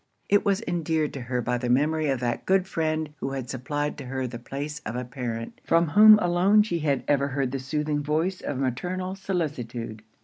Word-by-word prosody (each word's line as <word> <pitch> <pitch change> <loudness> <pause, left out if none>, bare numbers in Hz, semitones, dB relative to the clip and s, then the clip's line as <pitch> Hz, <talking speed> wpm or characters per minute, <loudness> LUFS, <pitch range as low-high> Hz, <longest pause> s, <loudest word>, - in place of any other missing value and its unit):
It 205 - +4
was 200 +2 +1
endeared 160 -3 0
to 135 - -5
her 125 0 -2
by 125 +1 0
the 125 0 -2
memory 150 +4 +2
of 135 -2 0
that 120 -1 -2
good 190 -1 +3
friend 155 -3 -2
who 135 0 -4
had 130 -3 -4
supplied 145 +3 -3
to - - -7
her 130 +1 -3
the 120 -1 -6
place 145 +4 -5
of 110 - -5
a 125 0 -3
parent; 120 -2 -5
from 165 -1 +3
whom 215 +5 +9
alone 190 +3 +4
she 175 -5 -2
had 140 -4 0
ever 140 -1 +2
heard 135 -2 -1
the 135 - -2
soothing 150 +3 -1
voice 160 +6 -1
of 145 - -3
maternal 180 +9 -2
solicitude. 130 - -4
145 Hz, 205 wpm, -26 LUFS, 125-170 Hz, -, whom